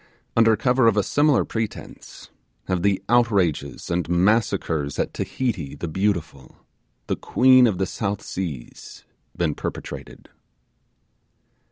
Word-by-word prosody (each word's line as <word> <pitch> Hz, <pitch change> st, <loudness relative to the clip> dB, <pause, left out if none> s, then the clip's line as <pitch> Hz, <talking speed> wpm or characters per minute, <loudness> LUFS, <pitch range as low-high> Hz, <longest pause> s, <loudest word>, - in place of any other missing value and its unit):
Under 115 Hz, -1 st, +5 dB
cover 125 Hz, +1 st, +3 dB
of 110 Hz, -2 st, +3 dB
a 105 Hz, -, +3 dB
similar 145 Hz, +2 st, +2 dB
pretence, 110 Hz, -2 st, -7 dB, 0.3 s
have 90 Hz, -2 st, -1 dB
the 100 Hz, 0 st, +1 dB
outrages 95 Hz, -, +1 dB
and 85 Hz, 0 st, -1 dB
massacres 90 Hz, -6 st, +1 dB
at -, -, -2 dB
Tahiti 100 Hz, -, -3 dB
the 85 Hz, -, -5 dB
beautiful, 80 Hz, -6 st, -2 dB, 0.5 s
the -, -, -1 dB
queen 130 Hz, -1 st, +5 dB
of 100 Hz, -5 st, -1 dB
the 95 Hz, -, 0 dB
South 100 Hz, +1 st, -3 dB
Seas, 80 Hz, -10 st, -7 dB, 0.3 s
been 80 Hz, -4 st, 0 dB
perpetrated. -, -, -7 dB
100 Hz, 120 wpm, -23 LUFS, 85-115 Hz, 0.5 s, Under